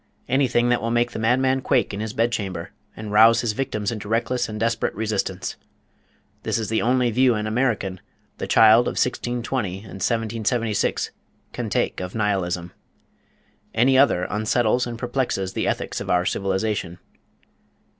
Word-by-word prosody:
Anything 120 -2 +2
that 120 - +2
will 115 - -2
make 120 +1 +1
the - - -5
madman 130 +4 +2
quake 130 -5 +1
in 100 - -4
his 110 0 -3
bedchamber, 110 -7 -2 0.3
and 110 -1 -6
rouse 115 +2 +6
his 120 - 0
victims 105 -3 -2
into 105 -2 -6
reckless 120 +2 0
and 105 0 -5
desperate 115 +1 0
resistance. 100 -4 -2 0.8
This - - -1
is 110 -2 -3
the 110 - +1
only 125 0 +2
view 125 +1 +3
an 105 0 -2
American, 110 -5 -1 0.4
the - - -3
child 115 +2 +6
of - - -1
1620 120 -5 -1
and - - -15 0.2
1776, 115 0 0 0.4
can - - -4
take - - -1
of 90 +2 -6
Nihilism. 90 -5 -1 1.0
Any 130 +4 +4
other 130 -9 +4
unsettles 110 +3 +1
and 120 -1 -5
perplexes 120 -6 -2
the - - -1
ethics - - -2
of - - -6
our 90 0 +2
civilization. 95 -2 -1
110 Hz, 155 wpm, -23 LUFS, 105-120 Hz, 1.0 s, rouse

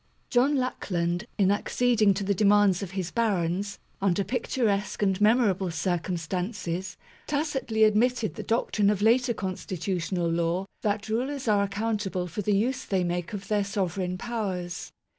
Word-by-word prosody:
John 265 +4 +4
Lackland, 180 -7 -1
in 195 -2 +4
acceding 215 -1 +2
to 200 - -2
the 200 +1 +1
demands 205 -1 +4
of 195 - -4
his 180 -2 -2
barons, 200 -3 0 0.2
under 195 0 +2
picturesque 215 -2 -1
and 195 0 +1
memorable 210 -4 +3
circum 175 +1 -1
stances, 180 +1 -3 0.3
tacitly 285 -7 0
admitted 220 +1 +3
the - - -6
doctrine 215 -3 +1
of 205 -1 0
later 235 +2 +3
con 190 -2 -3
stitutional 180 -1 -2
law 170 +3 0 0.2
that 210 0 -1
rulers 255 +5 -2
are 205 -2 +4
accountable 200 -2 -1
for 180 +4 -4
the 205 0 +2
use 255 +5 0
they 190 -2 0
make 175 0 -2
of 200 -1 -6
their 210 -1 +1
sovereign 185 -2 -2
powers. 190 -6 -4
200 Hz, 150 wpm, -27 LUFS, 185-225 Hz, 0.3 s, John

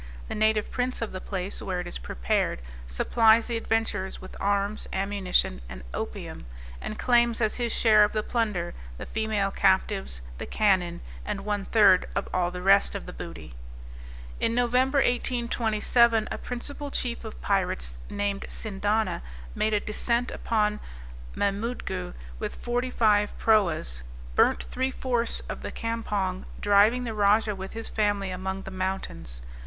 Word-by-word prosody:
The - - -2
native 215 0 +2
prince 250 0 -1
of 230 - -4
the 185 - -6
place 190 -1 -3
where 185 -2 -2
it 180 - -4
is 175 - -5
prepared, 60 0 -1 0.2
supplies 220 - +4
the 240 - -2
adventurers 225 -4 -1
with 185 - -10
arms, 200 +1 0
ammunition 190 - +1
and 60 +1 -8
opium, 60 -1 -5 0.3
and 215 - -5
claims 240 -2 +3
as 220 -2 +1
his 240 -2 -1
share 215 -2 +6
of 210 - +2
the 215 -1 -1
plunder, 210 -8 -1 0.2
the - - -6
female 215 -3 0
captives, 65 - +1 0.2
the - - -5
cannon, 185 -5 +2 0.2
and 205 -1 -4
one 205 -2 -1
third 205 -5 +5
of 200 - -1
all 180 -1 +2
the 180 0 -6
rest 195 +1 +5
of - - -5
the - - -8
booty. - - -8 0.9
In 230 - +1
Nov. 245 -1 +1
1827, 240 -3 +2
a - - -2
principal 285 +4 -5
chief 245 -3 -2
of - - -8
pirates, - - 0
named 205 -1 -2
Sindana, 210 - -1 0.3
made 215 0 +1
a - - +3
descent 235 +4 0
upon 210 -2 0 0.6
Mamoodgoo 200 - -2 0.2
with - - -4
forty 245 +1 -1
five 210 -4 +2
proas, 170 - +2 0.3
burnt - - +3
three 260 +1 -1
fourths 245 -3 0
of - - -7
the - - -5
campong, 205 -5 -2
driving 205 +5 +4
the 230 -2 -3
rajah 210 +1 +3
with 190 0 -7
his 225 0 -4
family 205 -3 0
among 190 +1 -4
the 190 - -7
mountains. 185 - -4
210 Hz, 150 wpm, -27 LUFS, 190-230 Hz, 0.9 s, share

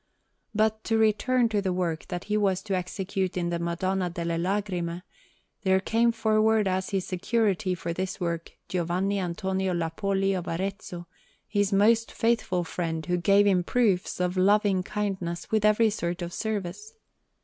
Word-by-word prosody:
But 220 0 +1
to 225 - +2
return 225 +3 +3
to 210 -2 +1
the 190 -2 -1
work 175 -3 -2
that 175 -1 -4
he 210 - -2
was 195 -3 +1
to 200 - -3
execute 185 0 -2
in 175 -1 -1
the 170 - -1
Madonna 180 +2 -1
delle 170 -1 -2
Lagrime: 180 -2 -2 0.6
there 190 -1 +3
came 230 +4 +2
forward 220 -1 +2
as 185 0 -1
his 195 -2 -1
security 195 -1 0
for 170 -1 -4
this 185 +1 -3
work 170 -1 -3
Giovanni 185 +3 0
Antonio 190 +1 -1
Lappoli 195 +4 0
of 180 -2 -3
Arezzo, 180 0 -4 0.4
his 205 -1 +1
most 220 +3 +3
faithful 225 -6 +1
friend, 165 -2 -3
who 180 0 0
gave 200 +3 +4
him 185 -3 +3
proofs 200 -5 +1
of 180 +1 0
loving 200 0 +3
kindness 185 -4 -3
with 215 -1 +2
every 215 +1 +4
sort 175 -3 -3
of 170 0 -5
service. 220 - -4
190 Hz, 160 wpm, -27 LUFS, 175-210 Hz, 0.6 s, gave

